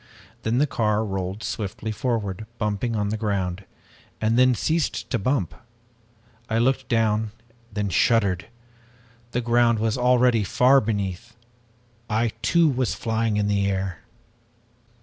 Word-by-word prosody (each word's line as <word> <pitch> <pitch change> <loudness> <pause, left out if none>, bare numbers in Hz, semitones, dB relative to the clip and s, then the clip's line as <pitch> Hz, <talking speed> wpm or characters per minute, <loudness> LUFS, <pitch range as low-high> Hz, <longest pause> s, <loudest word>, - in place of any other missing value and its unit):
Then 110 +2 0
the 145 - +4
car 110 -5 0
rolled 95 +1 -4
swiftly 110 +1 -4
forward, 110 -3 -2
bumping 105 +2 -1
on 105 -1 0
the 110 - -2
ground, 95 -3 -2 0.5
and 110 +1 +1
then 125 0 +5
ceased 160 +4 -1
to - - +1
bump. 100 - 0 1.0
I 110 - +1
looked 130 +2 +1
down, 110 -2 +1 0.4
then 105 -1 -2
shuddered. 95 0 +2 0.8
The 125 - -1
ground 120 0 +3
was 110 +2 0
already 125 -2 +4
far 130 +7 +4
beneath! 100 -4 -3 0.7
I 115 +2 +1
too, 170 -1 +4
was 130 -3 0
flying 115 -1 -1
in 105 - +1
the 100 -1 +1
air! 95 -2 -2
110 Hz, 130 wpm, -24 LUFS, 100-120 Hz, 1.0 s, then